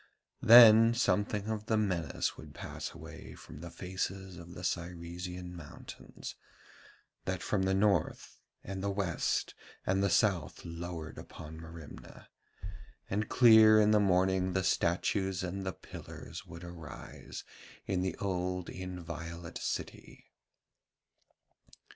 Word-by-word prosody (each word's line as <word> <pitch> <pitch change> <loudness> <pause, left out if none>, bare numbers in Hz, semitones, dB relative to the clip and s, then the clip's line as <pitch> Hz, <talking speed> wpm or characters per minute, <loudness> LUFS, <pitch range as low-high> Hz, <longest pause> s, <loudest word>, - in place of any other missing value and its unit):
Then 115 0 +9
something 105 -3 +1
of 110 0 -3
the 110 - +2
menace 95 -6 -1
would - - -12
pass - - -6
away - - -10
from - - -12
the 85 +2 -7
faces 95 +2 -4
of 85 +1 -11
the 90 - -8
Cyresian 90 +1 -4
mountains, 80 -4 -9 0.9
that - - -2
from 105 - 0
the 95 0 +2
north 95 -5 +1 0.2
and 95 0 -5
the 100 - -1
west 95 -4 -1 0.3
and 95 +1 +2
the 100 - +2
south 95 0 +1
lowered 85 -1 -6
upon 80 0 -10
Merimna, 80 -2 -11 0.8
and 105 +2 -1
clear 110 -3 +8
in 105 0 +5
the 105 - +5
morning 95 -1 +2
the 95 0 +1
statues 95 +2 +1
and 95 +1 -4
the - - 0
pillars - - -10
would 85 +1 -10
arise 85 -3 -9 0.4
in 90 -2 0
the 95 -2 -1
old 90 -2 -2
inviolate 85 -2 -6
city. - - -5
95 Hz, 125 wpm, -32 LUFS, 85-100 Hz, 0.9 s, Then